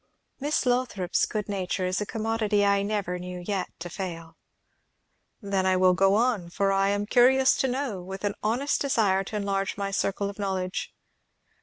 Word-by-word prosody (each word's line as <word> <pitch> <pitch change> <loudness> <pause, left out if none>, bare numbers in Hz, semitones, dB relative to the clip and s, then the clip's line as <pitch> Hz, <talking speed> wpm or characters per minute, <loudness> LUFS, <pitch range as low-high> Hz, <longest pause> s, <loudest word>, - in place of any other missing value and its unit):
"Miss 290 0 0
Lothrop's 245 -8 +1
good 210 -2 -3
nature 190 -2 -2
is 185 +2 -1
a 205 - -3
commodity 220 -2 0
I 200 0 +3
never 200 -3 -2
knew 180 0 -6
yet 190 +1 -3
to 170 - -6
fail." 165 -3 -6 1.1
"Then 195 -2 0
I 185 0 +3
will 185 0 +5
go 195 +2 +3
on, 225 -6 +1
for 195 +3 0
I 195 0 +2
am 205 0 0
curious 260 +4 +5
to 265 - +1
know, 255 -7 -2
with 190 +2 -8
an 205 0 0
honest 245 +7 0
desire 210 -8 +2
to 215 - -7
enlarge 195 -1 -1
my 200 -1 -2
circle 195 0 -1
of 200 +1 -8
knowledge. 190 -2 -2
200 Hz, 175 wpm, -26 LUFS, 185-220 Hz, 1.1 s, will